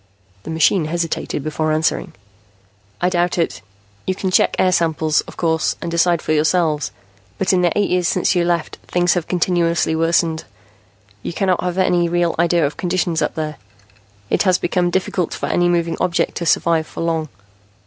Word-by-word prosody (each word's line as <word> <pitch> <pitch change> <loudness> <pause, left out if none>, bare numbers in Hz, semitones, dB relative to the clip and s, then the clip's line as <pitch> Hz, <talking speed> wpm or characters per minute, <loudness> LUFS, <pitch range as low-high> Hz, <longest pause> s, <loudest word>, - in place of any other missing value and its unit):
The 110 - -10
machine 160 +2 +2
hesitated 165 -3 -2
before 155 +1 -1
answering. 155 +1 0 0.9
"I 180 - +3
doubt 175 0 0
it. 145 -8 -1 0.5
You 185 - 0
can 190 0 -2
check - - +3
air 185 - +3
samples, 160 -3 +1
of - - -12
course, 160 -2 0
and 170 - -5
decide 170 0 +2
for 155 - 0
yourselves. 155 -1 +1 0.5
But 190 - +1
in 180 - +3
the 175 -1 +2
eight 205 - +1
years 180 -1 +2
since 185 - +1
you 175 -2 +2
left, 170 -2 -1
things 175 0 +2
have 175 -3 -2
continually 170 -2 +1
worsened. 165 0 +1 0.8
You - - -5
cannot 185 0 +1
have 180 0 -2
any 175 -2 +2
real 175 -1 +1
idea 170 -1 +3
of 145 - -3
conditions 175 -2 -1
up - - -1
there. 155 -1 -4 0.7
It - - +2
has 185 -2 +3
become 175 0 0
difficult 180 -1 -1
for - - -4
any 175 0 +1
moving 170 -1 0
object 180 -2 0
to 170 - -3
survive 160 0 +2
for - - -7
long. 165 -2 -1
170 Hz, 180 wpm, -19 LUFS, 160-180 Hz, 0.9 s, I